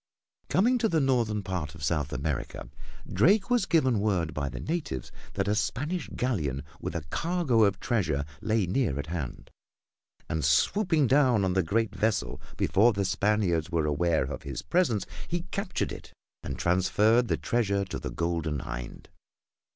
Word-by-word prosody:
Coming 245 Hz, +6 st, +3 dB
to 225 Hz, -1 st, +2 dB
the 165 Hz, -, +2 dB
northern 120 Hz, -7 st, +1 dB
part 90 Hz, -5 st, -4 dB
of 80 Hz, -, -10 dB
South 75 Hz, -1 st, 0 dB
America, 70 Hz, +1 st, -3 dB, 0.4 s
Drake 195 Hz, -, +3 dB
was 245 Hz, -6 st, +3 dB
given 130 Hz, -, +3 dB
word 95 Hz, -6 st, 0 dB
by 70 Hz, -2 st, -2 dB
the -, -, -7 dB
natives 155 Hz, -, -3 dB, 0.2 s
that 100 Hz, 0 st, -1 dB
a 105 Hz, -, +2 dB
Spanish 140 Hz, -, -2 dB
galleon 75 Hz, -, -1 dB, 0.2 s
with -, -, -5 dB
a 85 Hz, -, -2 dB
cargo 160 Hz, -10 st, +2 dB
of 100 Hz, -1 st, 0 dB
treasure 85 Hz, -, 0 dB, 0.2 s
lay 110 Hz, -2 st, +1 dB
near 95 Hz, -, 0 dB
at 70 Hz, -, -3 dB
hand, 75 Hz, -8 st, -5 dB, 0.8 s
and 80 Hz, -1 st, -2 dB
swooping 160 Hz, -, +3 dB
down 130 Hz, -6 st, +4 dB
on 90 Hz, -, +1 dB
the 95 Hz, -, +3 dB
great 105 Hz, +6 st, 0 dB
vessel 110 Hz, -1 st, -1 dB, 0.2 s
before 105 Hz, +8 st, +4 dB
the 100 Hz, -1 st, -1 dB
Spaniards 95 Hz, -4 st, +1 dB
were 85 Hz, -3 st, 0 dB
aware 80 Hz, +2 st, +1 dB
of 65 Hz, -, -5 dB
his 70 Hz, -2 st, -6 dB
presence 120 Hz, -, +1 dB, 0.2 s
he 175 Hz, 0 st, -2 dB
captured 195 Hz, -2 st, -2 dB
it -, -, -9 dB, 0.3 s
and -, -, -5 dB
transferred 105 Hz, +7 st, +3 dB
the -, -, +1 dB
treasure 100 Hz, -4 st, 0 dB
to 95 Hz, -, -5 dB
the -, -, -5 dB
Golden 80 Hz, -4 st, -2 dB
Hind. -, -, -7 dB
100 Hz, 165 wpm, -28 LUFS, 80-130 Hz, 0.8 s, down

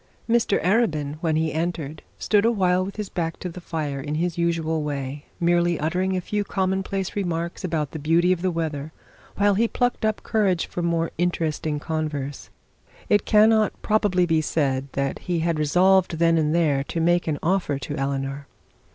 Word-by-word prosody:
Mr 230 Hz, -3 st, +2 dB
Arabin 155 Hz, -8 st, +1 dB
when 160 Hz, -2 st, +1 dB
he 160 Hz, 0 st, 0 dB
entered 160 Hz, -2 st, -3 dB, 0.2 s
stood 205 Hz, -1 st, +2 dB
awhile 185 Hz, -5 st, +2 dB
with 195 Hz, +1 st, -6 dB
his 210 Hz, -2 st, -4 dB
back 165 Hz, -3 st, -3 dB
to 180 Hz, -, -5 dB
the 175 Hz, +1 st, -9 dB
fire 150 Hz, -5 st, -3 dB
in 145 Hz, +3 st, -3 dB
his 170 Hz, +1 st, -1 dB
usual 165 Hz, -2 st, 0 dB
way, 145 Hz, -1 st, -4 dB
merely 175 Hz, -1 st, +2 dB
uttering 185 Hz, +4 st, 0 dB
a -, -, -1 dB
few 205 Hz, +3 st, -2 dB
commonplace 190 Hz, 0 st, -2 dB
remarks 170 Hz, -3 st, -3 dB
about 160 Hz, -5 st, -1 dB
the 160 Hz, -, -6 dB
beauty 165 Hz, +4 st, +3 dB
of 180 Hz, -2 st, 0 dB
the 185 Hz, -, +1 dB
weather, 160 Hz, -3 st, -3 dB, 0.4 s
while 205 Hz, 0 st, +3 dB
he 225 Hz, +4 st, +2 dB
plucked 245 Hz, 0 st, -1 dB
up 215 Hz, -1 st, 0 dB
courage 195 Hz, -6 st, +1 dB
for 175 Hz, -, -5 dB
the 170 Hz, -, 0 dB
more 165 Hz, -1 st, 0 dB
interesting 160 Hz, -3 st, -1 dB
converse. 150 Hz, -3 st, -4 dB, 0.6 s
It 205 Hz, -, +3 dB
cannot 215 Hz, 0 st, +4 dB
probably 205 Hz, -4 st, +2 dB
be 165 Hz, -2 st, +2 dB
said 140 Hz, -3 st, 0 dB
that 140 Hz, 0 st, -2 dB
he 175 Hz, -2 st, -2 dB
had 165 Hz, -1 st, 0 dB
resolved 180 Hz, +3 st, +3 dB
then 165 Hz, 0 st, +3 dB
and 155 Hz, +1 st, +1 dB
there 150 Hz, -5 st, +2 dB
to 165 Hz, -, -3 dB
make 175 Hz, +1 st, +2 dB
an 155 Hz, -2 st, 0 dB
offer 175 Hz, -5 st, +1 dB
to 140 Hz, +2 st, -5 dB
Eleanor. 135 Hz, 0 st, -3 dB
170 Hz, 180 wpm, -24 LUFS, 155-185 Hz, 0.6 s, cannot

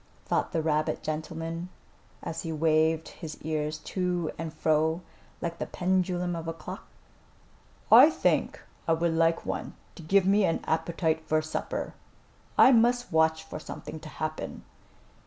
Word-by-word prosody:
thought -, -, 0 dB
the 160 Hz, -2 st, 0 dB
rabbit 155 Hz, -1 st, 0 dB
gentleman 165 Hz, +2 st, -4 dB, 0.5 s
as 165 Hz, -, -4 dB
he 165 Hz, -, -4 dB
waved 160 Hz, 0 st, +2 dB
his 155 Hz, -2 st, -9 dB
ears 155 Hz, 0 st, -2 dB
to 180 Hz, 0 st, -2 dB
and 165 Hz, 0 st, -5 dB
fro 160 Hz, +2 st, +1 dB, 0.4 s
like 170 Hz, 0 st, -4 dB
the -, -, -3 dB
pendulum 180 Hz, -1 st, 0 dB
of 165 Hz, -1 st, -5 dB
a 165 Hz, -, -2 dB
clock. 165 Hz, -, -9 dB, 1.0 s
"I 250 Hz, +7 st, +10 dB
think -, -, +1 dB, 0.3 s
I 165 Hz, -, +4 dB
would 165 Hz, 0 st, +1 dB
like 165 Hz, 0 st, +2 dB
one -, -, -4 dB, 0.2 s
to -, -, -11 dB
give 190 Hz, +4 st, +3 dB
me 200 Hz, +2 st, +4 dB
an 165 Hz, -, +1 dB
appetite 160 Hz, 0 st, 0 dB
for 155 Hz, 0 st, +1 dB
supper. 155 Hz, -, -4 dB, 0.6 s
I -, -, +8 dB
must 245 Hz, 0 st, +3 dB
watch 160 Hz, 0 st, +3 dB
for 160 Hz, -, -7 dB
something 160 Hz, -, -8 dB
to 155 Hz, -, -10 dB
happen." 155 Hz, 0 st, -5 dB
165 Hz, 150 wpm, -28 LUFS, 155-175 Hz, 1.0 s, I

